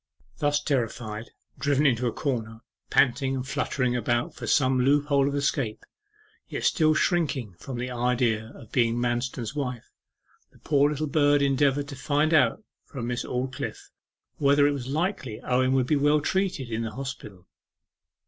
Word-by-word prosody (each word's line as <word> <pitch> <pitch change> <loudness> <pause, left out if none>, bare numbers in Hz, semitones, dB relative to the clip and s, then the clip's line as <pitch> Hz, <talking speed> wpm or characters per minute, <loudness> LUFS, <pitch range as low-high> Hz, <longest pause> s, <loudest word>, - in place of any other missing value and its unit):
Thus 145 0 +2
terrified, 115 -5 -2 0.3
driven 145 0 +2
into 125 -3 +2
a - - 0
corner, 115 -4 -3 0.3
panting 135 +1 +2
and 130 0 -4
fluttering 125 -2 -1
about 120 0 0
for - - -7
some 130 -2 +3
loophole 140 +1 +3
of 140 - -1
escape, 135 -5 -1 0.6
yet - - -4
still 155 -2 +3
shrinking 150 - 0
from 130 +3 -6
the 125 +1 -4
idea 120 -2 0
of 115 - -14
being 115 -2 +2
Manston's 120 0 -2
wife, 125 -5 -4 0.6
the - - -22
poor 145 -1 +2
little 150 +1 -2
bird 145 -1 +3
endeavoured 140 +1 +2
to 140 - -7
find 150 +3 +1
out 145 - +3 0.2
from 125 -5 -6
Miss 120 0 -2
Aldclyffe 130 +1 -4 0.5
whether 145 0 +4
it 145 - +4
was 135 -3 -4
likely 145 - -2
Owen 130 +1 +1
would 130 -2 +2
be 150 - +2
well 145 +2 +3
treated 175 -6 -1
in 110 +1 -1
the 115 - -3
hospital. 110 -8 -8
130 Hz, 160 wpm, -26 LUFS, 120-145 Hz, 0.6 s, whether